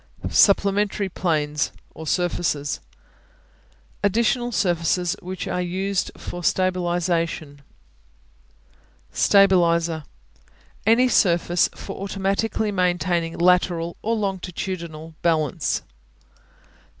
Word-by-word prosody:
Supplementary 200 0 +3
Planes 150 -5 -1 0.2
(or 160 0 -9
surfaces) 160 -5 -1 1.2
Additional 235 +4 +1
surfaces 175 -2 +1
which 185 -1 -5
are 180 - -1
used 190 +2 -1
for 175 0 -7
stabilization. 175 -5 0 1.5
Stabilizer 170 -5 +3 0.8
Any 235 +3 +5
surface 175 -6 +3
for - - -8
automatically 200 +2 -1
maintaining 175 -3 0
lateral 175 -1 +2
or 230 +2 0
longitudinal 180 -5 -4
balance. 155 -5 0
180 Hz, 75 wpm, -23 LUFS, 170-195 Hz, 1.5 s, Any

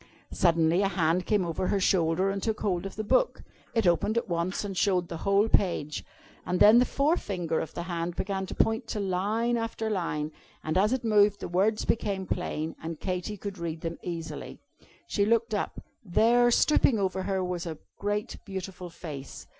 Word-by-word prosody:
Suddenly 170 0 +3
a 200 - +3
hand 180 -1 +1
came 205 -4 +2
over 170 +2 -2
her 200 - +1
shoulder 185 0 +2
and 195 0 -3
took 220 0 -2
hold 190 -2 0
of 195 - -10
the 215 - -3
book. - - +1 0.3
It 225 -3 +2
opened 175 +6 +2
at 235 - 0
once, 175 +3 -1
and 195 -2 -5
showed 180 -2 +1
the 165 - -4
whole 200 +2 +4
page. 170 -8 +1 0.4
And 180 0 -1
then 220 +3 +8
the 250 - +4
forefinger 200 - 0
of 160 - -5
the 170 - -3
hand 170 -1 -3
began 190 -1 -2
to - - -6
point 225 +1 +1
to 215 - -3
line 205 +5 0
after 225 -1 -2
line, 155 -6 -2 0.3
and 155 - -2
as 205 +4 +3
it 260 -1 0
moved 210 -2 +4
the - - -5
words 200 +5 +1
became 200 -4 -1
plain, 160 -3 -3
and 160 -1 -5
Katy 185 +2 -3
could 200 -1 -6
read 165 -1 -4
them 165 0 -4
easily. 165 -2 -6 0.5
She 200 - 0
looked 230 +1 +2
up. 205 - -2 0.2
There, 235 +5 +4
stooping 250 -1 +4
over 190 -2 -1
her, 190 0 -1
was 180 -1 -3
a 160 -2 -5 0.2
great 205 +1 -2
beautiful 190 -2 -6
Face. 150 -5 -8
190 Hz, 190 wpm, -28 LUFS, 170-210 Hz, 0.5 s, then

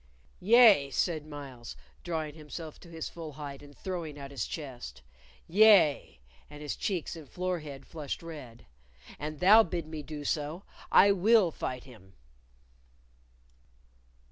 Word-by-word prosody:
"Yea," 210 - +6
said 155 +1 -1
Myles, 135 -5 -9 0.3
drawing 160 -3 -3
himself 155 +1 -9
to 170 - -15
his 165 -1 -5
full 160 -3 -8
height 140 -1 -8
and 145 -1 -15
throwing 170 -6 -5
out 140 -1 -8
his 135 -7 -3
chest. 120 - -8 0.4
"Yea," 190 - +5 0.3
and 150 0 -10
his 150 - -3
cheeks 180 -4 -3
and 155 -5 -11
forehead 165 -7 -4
flushed 155 -1 -6
red; 145 -8 -10 0.5
"an 150 +1 -5
thou 205 +7 +7
bid 170 -4 -3
me 155 -1 -7
do 145 0 -8
so, 155 +6 -2 0.3
I 200 - +7
will 200 -1 +4
fight 130 -4 -5
him." 105 -7 -16
155 Hz, 135 wpm, -30 LUFS, 140-175 Hz, 0.5 s, thou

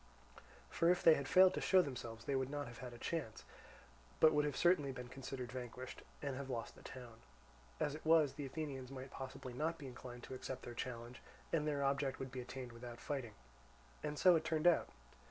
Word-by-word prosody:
For 165 - +3
if 180 0 +3
they 165 - +9
had 140 -3 -1
failed 185 0 +7
to - - -2
show 185 -1 +6
themselves 120 -5 -6
they 140 - 0
would 130 0 0
not 145 0 -3
have 120 -1 -10
had 125 -2 -6
a 120 - -10
chance, 130 -5 -3 0.8
but 160 - +7
would 150 0 +3
have 145 -3 -1
certainly 170 -6 +4
been 125 -1 -7
considered 130 -1 -6
vanquished, 125 0 -6 0.2
and 140 -2 -1
have 135 0 -5
lost 115 -3 -3
the - - -15
town. 120 -3 -10 0.6
As 145 - +1
it 155 - -7
was, 160 -3 +5
the 145 - -5
Athenians 135 -3 -4
might 135 -1 -7
possibly 130 -1 -6
not 160 +6 -1
be 145 - -9
inclined 125 -1 -8
to - - -7
accept 130 0 -5
their 120 - -6
challenge, 120 0 -5 0.3
and 155 -2 +2
their 145 -2 0
object 135 0 +1
would 135 -1 -5
be 130 -1 -4
attained 125 0 -6
without 120 0 -8
fighting. 130 -7 -4 0.7
And 150 0 -3
so 180 +2 +7
it 160 - +2
turned 160 0 0
out. 175 -1 +5
135 Hz, 210 wpm, -38 LUFS, 125-150 Hz, 0.8 s, they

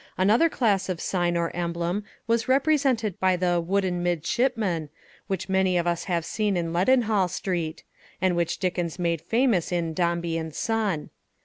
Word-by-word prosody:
Another 215 - +4
class 205 -10 +1
of 180 -3 -2
sign 175 -1 0
or 170 -1 -2
emblem 175 +3 -2 0.2
was 230 0 +1
represented 265 - +2
by 185 -1 +3
the 175 -1 +1
"wooden 185 0 0
midshipman," 175 - 0 0.4
which 190 -1 -3
many 190 -1 +2
of 170 - 0
us 170 -1 -1
have 170 -3 -1
seen 210 -1 0
in 165 -1 -2
Leadenhall 215 0 +3
Street, 170 -4 -3 0.4
and 185 -1 +2
which 170 -1 0
Dickens 175 -3 -2
made 170 -3 0
famous 225 -1 +1
in 170 -2 -1
"Dombey 170 -1 0
and 160 -1 -6
Son." 215 -8 -1
180 Hz, 155 wpm, -25 LUFS, 170-210 Hz, 0.4 s, Another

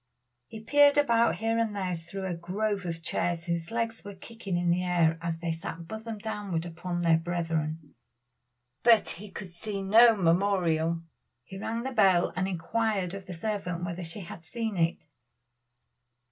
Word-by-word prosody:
He 220 - -8
peered 290 +5 +5
about 235 -5 +4
here 225 +1 0
and 220 -2 0
there 185 -3 -1
through 170 +4 -6
a 185 - -2
grove 195 +3 -2
of 165 -1 -5
chairs 170 0 -1
whose 170 -2 -2
legs 230 0 -2
were 200 0 -8
kicking 195 -2 -5
in 175 0 +2
the 180 +1 +2
air 170 -2 +2
as 170 -1 -2
they 165 0 -2
sat 165 0 -6
bosom 220 +2 -6
downward 205 -6 -3
upon 175 +1 -4
their 165 -1 +4
brethren, 165 -3 -3 0.9
but 230 -3 +5
he 205 +4 -7
could 190 -2 -8
see 195 +3 -5
no 225 +4 +7
memorial. 170 -3 +2 0.4
He 190 +8 -9
rang 230 +3 -3
the 265 - -3
bell 190 -7 +4
and 185 +1 0
inquired 195 +1 -1
of 195 -1 -8
the 180 - -6
servant 180 -2 -3
whether 175 +1 -4
she 165 +5 -6
had 170 -2 -9
seen 225 +3 -3
it. 165 -2 0
185 Hz, 170 wpm, -28 LUFS, 170-215 Hz, 0.9 s, no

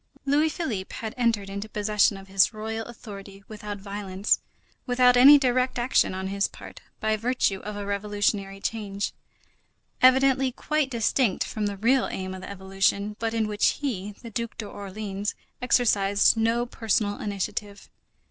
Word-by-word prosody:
Louis 295 +3 +3
Philippe 240 - -4
had 220 -1 -5
entered 230 -5 +1
into 200 +2 -6
possession 210 -1 +2
of 195 0 -12
his 195 +3 +3
royal 220 +1 -4
authority 200 -4 -10
without 210 -1 -7
violence, 200 0 -1 0.5
without 250 0 +4
any 275 +4 +9
direct 255 -2 +1
action 240 -5 +2
on 190 0 -4
his 200 0 +1
part, - - -12 0.2
by 220 0 +1
virtue 225 -3 0
of 210 +1 -7
a 205 0 -5
revolutionary 200 -1 -1
change, 200 -2 -3 0.9
evidently 265 0 +5
quite 305 +2 -1
distinct 235 -3 +1
from 210 -2 -3
the 200 -1 -4
real 245 +5 +3
aim 185 0 -5
of 185 - -8
the - - -8
Revolution, 195 +1 -1
but 225 0 -2
in 225 -1 +1
which 210 -1 +2
he, 210 -8 -3
the 230 - -8
Duc 235 +1 -4
d'Orléans, 205 -1 -5 0.3
exercised 205 -6 +3
no 230 +2 +1
personal 215 -3 -1
initiative. 200 0 -4
210 Hz, 150 wpm, -26 LUFS, 200-240 Hz, 0.9 s, any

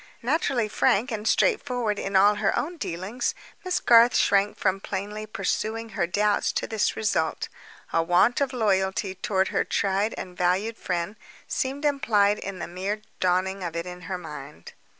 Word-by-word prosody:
Naturally 260 -3 +1
frank 215 +3 +2
and 215 -1 -3
straightforward 245 - +1
in 195 0 -3
all 200 +2 +6
her 200 - +2
own 340 +4 -2
dealings, 205 - -3 0.3
Miss 365 -1 0
Garth 235 +1 +6
shrank 200 +1 +3
from 190 +1 +1
plainly 210 +2 -5
pursuing 225 +1 -2
her 195 -6 -1
doubts 205 +3 +1
to - - -1
this 220 -2 0
result: 215 -1 -1 0.4
a 165 - +3
want 180 +10 +3
of 275 - +1
loyalty 195 -4 0
toward 190 -1 0
her - - +1
tried 200 +2 0
and 180 -1 -7
valued 185 +6 0
friend 175 +3 -3 0.3
seemed 275 +3 -2
implied 210 -8 +2
in 195 -1 -6
the - - -5
mere 190 +5 -3 0.2
dawning 185 +1 +1
of 170 -2 -4
it 170 +1 -2
on 180 0 -8
her 185 - -2
mind. 150 -4 -10
205 Hz, 165 wpm, -26 LUFS, 185-230 Hz, 0.4 s, all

